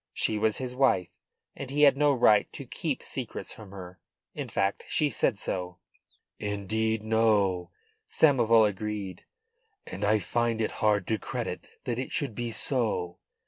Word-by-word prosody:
She 110 - 0
was 110 0 +2
his 130 -1 -4
wife, 125 -10 +3 0.5
and 140 - -7
he 145 +2 +2
had 140 -2 +7
no 145 +1 +4
right 115 -5 +4
to - - -7
keep - - -3
secrets - - -5
from 105 -3 -12
her. 95 -2 -10 0.3
In - - -5
fact 100 +1 0
she 150 -2 +1
said 110 - +1
so. 90 -2 -4 0.6
"Indeed 110 +2 -1
no," 105 -5 +2 0.4
Samoval 115 -7 +5
agreed. 100 -2 -5 0.6
"And - - -6
I 110 +1 +4
find 115 +4 0
it 110 - 0
hard 105 -3 +3
to 110 -1 -1
credit - - -5 0.2
that 120 -1 -2
it 130 - -4
should 140 -7 -1
be 120 +2 -3
so." 110 -8 -1
110 Hz, 155 wpm, -28 LUFS, 100-120 Hz, 0.6 s, had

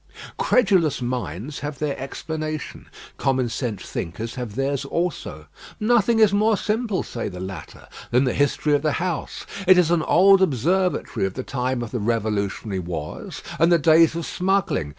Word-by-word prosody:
Credulous 185 - +3
minds 125 - -4
have 145 -1 -5
their 150 -2 -2
explanation; 155 +3 -5 0.3
common 130 -2 +1
sense 115 -4 -4
thinkers 110 +7 -5
have 120 -5 -6
theirs 135 +1 -1
also. 140 - -3 0.3
"Nothing 230 0 +3
is 215 -3 +5
more 215 +1 +3
simple," 215 -1 -1
say 115 - -5
the 90 -2 -8
latter, 95 -4 -8 0.2
"than 125 +3 +3
the 125 - +1
history 145 +1 +1
of 145 - +3
the 155 -1 0
house. 175 -4 -3 0.2
It 185 0 +7
is 175 -2 +4
an 175 -2 +3
old 195 +4 +5
observatory 180 - +1
of 95 - -8
the 130 - -4
time 125 -1 -2
of 115 - -7
the 125 - -2
revolutionary 105 -2 -1
wars 85 -4 -6 0.2
and 165 +2 +4
the 170 - +6
days 165 +1 +5
of 170 - -3
smuggling. 180 - 0
145 Hz, 165 wpm, -23 LUFS, 115-180 Hz, 0.3 s, It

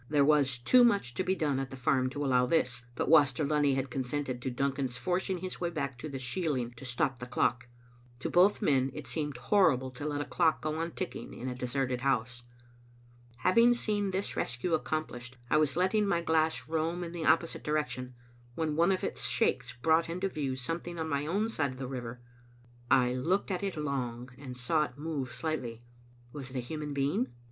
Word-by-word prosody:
There 145 -1 +4
was 140 -4 +3
too 245 - +5
much 200 - +3
to 185 - -1
be 185 +1 +1
done 145 -6 0
at 135 -1 -3
the 135 - -8
farm 130 0 +2
to 145 +2 -3
allow 125 -2 +3
this, 125 -5 +1
but - - -1
Waster 150 -3 +5
Lunny 145 -2 +2
had 135 -1 -2
consented 130 0 -2
to 130 - -2
Duncan's 130 0 -1
forcing 180 +8 -1
his 185 +1 -6
way 175 - 0
back 140 -6 -4
to 155 - -5
the 135 - -5
shieling 130 -1 -2
to 130 - -9
stop 130 +1 0
the 125 - -6
clock. 125 0 0 0.5
To 130 - -3
both 185 +4 +4
men 135 -2 +3
it 150 - -6
seemed 145 +3 -3
horrible 135 -9 +3
to 135 +4 -5
let 145 -1 -2
a 145 - -2
clock 165 -3 +2
go 155 0 -2
on 165 +1 -3
ticking 185 - -5
in 125 - -6
a 125 - -2
de 125 0 -4
serted 125 -1 -1
house. 125 -2 0 1.0
Having 230 +6 +5
seen 205 -4 0
this 190 +1 -2
rescue 125 +8 -1
accomplished, 130 -6 -2
I 150 - +5
was 155 0 +2
letting 200 +3 +2
my 170 -4 +2
glass 160 -6 +1
roam 165 +2 -1
in 170 - -5
the 170 -2 -3
opposite 165 0 +2
direction, 150 -4 -2 0.4
when 155 -2 -1
one 170 +4 +4
of 190 - 0
its - - -2
shakes - - +1
brought 165 +1 +3
into 180 +3 -1
view 140 -6 -2
something 165 +7 -4
on 160 -1 -2
my 140 0 -1
own 200 +7 +1
side 160 -11 0
of - - -12
the 130 - -4
river. 125 -2 -6 0.7
I 125 -1 +4
looked 180 +11 0
at 185 - -1
it 195 -4 -3
long, 125 -4 -3
and 130 -3 -8
saw 150 +5 +2
it 125 -1 -12
move 145 -4 -3
slightly. 125 -8 -4 0.5
Was 135 -3 -6
it 130 - -11
a - - 0
human 150 +4 -5
being? 140 -2 0
145 Hz, 205 wpm, -31 LUFS, 125-165 Hz, 1.0 s, too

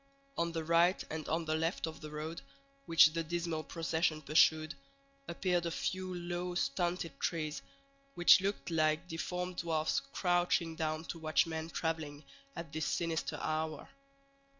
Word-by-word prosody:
On 170 0 0
the 165 -1 -3
right 170 +3 +3
and 155 -1 -4
on 165 +1 0
the 155 - 0
left 160 +2 0
of 160 -1 -7
the 155 - -7
road, 155 +2 -5 0.5
which 165 -2 +7
the 165 0 -1
dismal 165 -1 -2
procession 160 -1 -1
pursued, 155 +1 +4 0.5
appeared 175 0 0
a - - 0
few 185 +2 -3
low, 175 0 -3
stunted 170 -1 -1
trees, 155 -3 -2 0.5
which 175 +1 +7
looked 195 -2 -2
like 155 0 +2
deformed 180 +2 -4
dwarfs 160 - +1
crouching 175 -10 0
down 155 0 -2
to 165 - -6
watch 155 -1 +2
men 160 0 -4
traveling 160 -3 -3 0.3
at 165 -4 -7
this 160 -2 -1
sinister 165 -2 -1
hour. 155 -1 -2
165 Hz, 150 wpm, -34 LUFS, 155-175 Hz, 0.5 s, which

